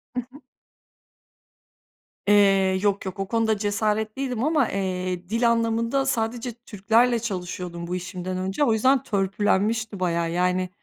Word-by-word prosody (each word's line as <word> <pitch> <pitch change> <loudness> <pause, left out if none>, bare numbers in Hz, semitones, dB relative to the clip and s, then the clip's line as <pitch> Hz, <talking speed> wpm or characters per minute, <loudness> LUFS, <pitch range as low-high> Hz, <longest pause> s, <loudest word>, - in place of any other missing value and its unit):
Hı - - 0
hı. 260 +4 -17 1.9
Eee, 195 -2 +4
yok 200 -1 0
yok 190 0 -6
o 195 - -2
konuda 225 -1 +1
cesaretliydim 220 +4 -1
ama, 300 -4 +2
eee, 185 -2 -3
dil 230 +2 +2
anlamında 230 +3 0
sadece 235 -1 -1
Türklerle 230 +2 +1
çalışıyordum 180 -5 -5
bu 180 - -2
işimden 185 0 -5
önce 190 +10 -1
o 230 - +3
yüzden 260 +4 +3
törpülenmişti 205 +2 0
bayağı 170 -2 0
yani 180 +1 0
205 Hz, 130 wpm, -24 LUFS, 185-230 Hz, 1.9 s, Eee